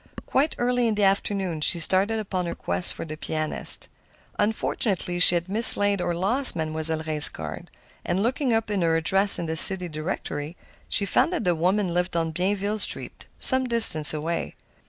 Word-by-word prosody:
Quite 285 Hz, +4 st, -4 dB
early 245 Hz, 0 st, -3 dB
in 220 Hz, -, -4 dB
the 205 Hz, -, -4 dB
afternoon 195 Hz, -4 st, -4 dB
she 170 Hz, +3 st, +1 dB
started 190 Hz, +6 st, -1 dB
upon 190 Hz, -4 st, -7 dB
her -, -, -8 dB
quest 90 Hz, +1 st, +1 dB
for -, -, -10 dB
the 155 Hz, -1 st, -11 dB
pianist. 155 Hz, 0 st, -3 dB, 0.5 s
Unfortunately 205 Hz, -4 st, -5 dB
she 175 Hz, -, +7 dB
had 170 Hz, +1 st, -5 dB
mislaid 205 Hz, -1 st, +5 dB
or 175 Hz, -, -5 dB
lost 235 Hz, +10 st, +4 dB
Mademoiselle 160 Hz, 0 st, -2 dB
Reisz's 155 Hz, -1 st, +6 dB
card, 75 Hz, -2 st, -12 dB, 0.3 s
and 185 Hz, +3 st, -5 dB
looking 255 Hz, +2 st, -4 dB
up 225 Hz, -1 st, -4 dB
her 170 Hz, -5 st, -3 dB
address 195 Hz, +5 st, +5 dB
in 170 Hz, -, -7 dB
the 160 Hz, 0 st, -7 dB
city 180 Hz, +2 st, +6 dB
directory, 155 Hz, 0 st, -9 dB, 0.3 s
she 200 Hz, -, 0 dB
found 200 Hz, -, -2 dB
that 340 Hz, -, -6 dB
the 180 Hz, -, -2 dB
woman 180 Hz, +3 st, -4 dB
lived 180 Hz, 0 st, -5 dB
on 165 Hz, -1 st, -4 dB
Bienville 200 Hz, +5 st, -5 dB
Street, -, -, -3 dB
some 260 Hz, -1 st, +2 dB
distance 160 Hz, -, +5 dB
away. 160 Hz, +2 st, -7 dB
180 Hz, 175 wpm, -20 LUFS, 160-210 Hz, 0.5 s, she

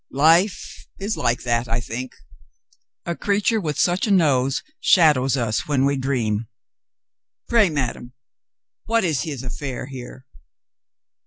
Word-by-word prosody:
"Life 165 Hz, +8 st, +2 dB
is 205 Hz, +3 st, -3 dB
like 120 Hz, +1 st, -1 dB
that, 120 Hz, 0 st, 0 dB
I 115 Hz, +1 st, -1 dB
think. 120 Hz, +2 st, -6 dB, 0.9 s
A 170 Hz, -, -2 dB
crea 200 Hz, +3 st, 0 dB
ture 220 Hz, +1 st, +1 dB
with 150 Hz, -4 st, -3 dB
such 180 Hz, +4 st, +1 dB
a -, -, -2 dB
nose 140 Hz, -9 st, +2 dB, 0.2 s
shadows 145 Hz, -, +4 dB
us 115 Hz, -3 st, -1 dB
when 140 Hz, -2 st, +2 dB
we 140 Hz, 0 st, +1 dB
dream. 120 Hz, -5 st, -1 dB, 1.0 s
Pray, 225 Hz, -5 st, +4 dB
madame, 125 Hz, -4 st, -3 dB, 0.7 s
what 230 Hz, 0 st, +1 dB
is 155 Hz, -8 st, 0 dB
his 140 Hz, -4 st, -5 dB
affair 130 Hz, 0 st, -5 dB
here?" 130 Hz, -1 st, -10 dB
140 Hz, 135 wpm, -22 LUFS, 125-175 Hz, 1.0 s, shadows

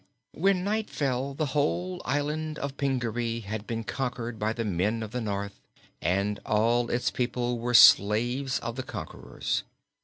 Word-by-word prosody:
When 185 Hz, +1 st, +2 dB
night 215 Hz, +2 st, -1 dB
fell 135 Hz, -1 st, -1 dB
the 155 Hz, -, 0 dB
whole 175 Hz, +5 st, 0 dB
of -, -, -10 dB
the -, -, -6 dB
Island 150 Hz, +2 st, -1 dB
of 140 Hz, -1 st, -4 dB
Pingaree 120 Hz, -4 st, -1 dB
had 105 Hz, 0 st, -5 dB
been 115 Hz, -1 st, -3 dB
conquered 120 Hz, -2 st, -3 dB
by 105 Hz, +1 st, 0 dB
the 115 Hz, 0 st, -3 dB
men 105 Hz, +4 st, 0 dB
of 110 Hz, -, -7 dB
the 125 Hz, +1 st, -3 dB
North, 100 Hz, -2 st, -4 dB, 0.4 s
and 100 Hz, +3 st, 0 dB
all 115 Hz, +3 st, +2 dB
its 120 Hz, -, 0 dB
people 120 Hz, -1 st, -1 dB
were 120 Hz, +1 st, 0 dB
slaves 120 Hz, +6 st, +6 dB
of 115 Hz, +1 st, -5 dB
the -, -, -1 dB
conquerors. -, -, -4 dB
120 Hz, 165 wpm, -28 LUFS, 110-140 Hz, 0.4 s, slaves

